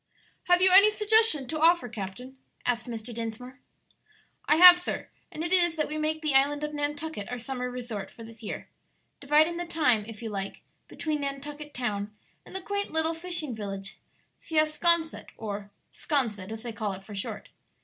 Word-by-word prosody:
"Have 355 Hz, 0 st, +4 dB
you 375 Hz, -, +6 dB
any 400 Hz, +3 st, +9 dB
suggestion 425 Hz, -, +3 dB
to 310 Hz, -, -2 dB
offer, 335 Hz, -5 st, +5 dB
captain?" 240 Hz, +4 st, -7 dB, 0.3 s
asked 245 Hz, 0 st, 0 dB
Mr. 230 Hz, 0 st, -6 dB
Dinsmore. 230 Hz, +4 st, -6 dB, 0.9 s
"I 300 Hz, -, +5 dB
have, 355 Hz, +1 st, +10 dB
sir; 355 Hz, -, -4 dB, 0.2 s
and 315 Hz, -, -5 dB
it 345 Hz, -, -1 dB
is 345 Hz, -3 st, +5 dB
that 305 Hz, -2 st, 0 dB
we 305 Hz, +1 st, -4 dB
make 310 Hz, +1 st, -1 dB
the 305 Hz, -2 st, +1 dB
island 285 Hz, +2 st, +3 dB
of 300 Hz, 0 st, -3 dB
Nantucket 295 Hz, -5 st, -3 dB
our 250 Hz, -, -4 dB
summer 250 Hz, +1 st, -4 dB
resort 240 Hz, -5 st, -6 dB
for 230 Hz, -, -12 dB
this 225 Hz, -1 st, -12 dB
year, 215 Hz, -, -6 dB, 0.5 s
dividing 305 Hz, +4 st, +3 dB
the 350 Hz, 0 st, -4 dB
time, 250 Hz, -10 st, +2 dB
if 225 Hz, 0 st, -9 dB
you 225 Hz, -, -4 dB
like, 195 Hz, -1 st, -5 dB, 0.2 s
between 305 Hz, -2 st, -3 dB
Nantucket 290 Hz, +2 st, -6 dB
Town 210 Hz, -4 st, -3 dB, 0.3 s
and -, -, -12 dB
the 380 Hz, -, -3 dB
quaint 405 Hz, +1 st, -2 dB
little 320 Hz, +1 st, 0 dB
fishing 325 Hz, -5 st, -2 dB
village 195 Hz, -2 st, -6 dB, 0.4 s
Siasconset, 320 Hz, +1 st, +1 dB
or 205 Hz, -2 st, -5 dB, 0.2 s
'Sconset, 220 Hz, -, -2 dB
as 220 Hz, +1 st, -6 dB
they 235 Hz, -2 st, -5 dB
call 210 Hz, -2 st, -3 dB
it 190 Hz, +1 st, -10 dB
for 210 Hz, -, -10 dB
short. 195 Hz, -, -5 dB
280 Hz, 180 wpm, -28 LUFS, 225-320 Hz, 0.9 s, have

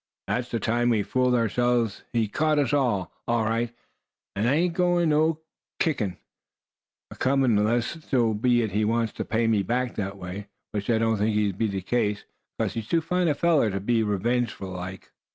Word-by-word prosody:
That's 125 Hz, 0 st, -2 dB
the 115 Hz, -, -1 dB
time 120 Hz, +3 st, +1 dB
we 110 Hz, -3 st, +2 dB
fooled 125 Hz, +3 st, +1 dB
ourselves. 120 Hz, -1 st, +1 dB
He 115 Hz, -2 st, +1 dB
caught 155 Hz, +7 st, +1 dB
us, 140 Hz, -4 st, +1 dB
all 120 Hz, -10 st, +1 dB, 0.2 s
right, 115 Hz, 0 st, 0 dB, 0.6 s
and 105 Hz, +4 st, +1 dB
I 140 Hz, -, +3 dB
ain't 170 Hz, +2 st, +1 dB
got 175 Hz, 0 st, +2 dB
no 155 Hz, +1 st, +2 dB, 0.4 s
kick 155 Hz, -6 st, +1 dB, 1.1 s
acomin', 130 Hz, -3 st, +2 dB
'less 120 Hz, +8 st, -1 dB
so 120 Hz, -4 st, +2 dB
be 120 Hz, +1 st, +2 dB
he 105 Hz, +2 st, 0 dB
wants 115 Hz, +1 st, 0 dB
to -, -, -4 dB
pay 115 Hz, +1 st, 0 dB
me 110 Hz, -3 st, +3 dB
back 120 Hz, +5 st, -1 dB
that 100 Hz, -1 st, -3 dB
way; 95 Hz, +2 st, -7 dB, 0.2 s
which 105 Hz, 0 st, -4 dB
I 115 Hz, -, +4 dB
don't 115 Hz, -1 st, +1 dB
think's 105 Hz, +1 st, +1 dB
goin' 105 Hz, -1 st, +2 dB
to -, -, -12 dB
be 115 Hz, -, +2 dB
the 100 Hz, -2 st, -3 dB
case, 105 Hz, 0 st, -1 dB, 0.3 s
'cause -, -, 0 dB
he's 115 Hz, -2 st, -5 dB
too 165 Hz, +4 st, +2 dB
fine 180 Hz, +2 st, 0 dB
a 150 Hz, -, +2 dB
feller 160 Hz, -7 st, +3 dB
to 95 Hz, -1 st, -2 dB
be 115 Hz, +3 st, +1 dB
revengeful 110 Hz, 0 st, -1 dB
like." 90 Hz, +1 st, -7 dB
115 Hz, 190 wpm, -26 LUFS, 105-130 Hz, 1.1 s, I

